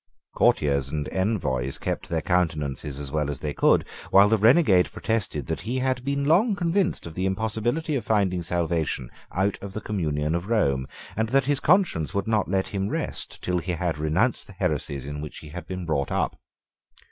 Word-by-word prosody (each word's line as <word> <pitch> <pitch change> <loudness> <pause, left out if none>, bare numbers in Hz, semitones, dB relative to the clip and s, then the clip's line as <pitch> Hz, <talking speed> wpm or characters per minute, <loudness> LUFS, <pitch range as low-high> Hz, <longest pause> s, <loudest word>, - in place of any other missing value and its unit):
Courtiers 70 -2 +2
and 75 0 -3
envoys 85 - -1
kept - - -3
their 80 -1 -1
countenances 75 -5 -1
as 70 -2 -5
well 75 -1 0
as 70 - -3
they 75 +2 -4
could - - +3 0.2
while 100 +1 +7
the 110 - +4
renegade 110 - +5
protested 105 - -2
that - - -3
he 120 +7 -2
had 130 -1 0
been 140 +1 -1
long 195 +9 +4
convinced 180 +1 0
of 85 - -7
the 95 +3 -1
impossibility 110 +10 -1
of 135 - -1
finding 95 -5 +1
salvation 80 -7 -1 0.2
out 95 +2 0
of 100 -1 -7
the 110 - -3
communion 75 -7 -1
of 85 +4 -2
Rome, 70 - +1 0.3
and 110 +1 0
that 135 +1 +3
his 145 0 +1
conscience 165 - +2
would 100 0 -1
not 110 -3 +1
let 95 0 0
him 100 0 -2
rest - - -4
till 90 -1 0
he 90 +1 -3
had 85 -3 -2
renounced 85 +11 +1
the 100 - -12
heresies 75 -7 -2
in 75 +1 -5
which 75 - -7
he 75 - -10
had 85 +2 -8
been 90 -1 -5
brought 70 -4 -1
up. - - 0
90 Hz, 195 wpm, -25 LUFS, 75-110 Hz, 0.3 s, while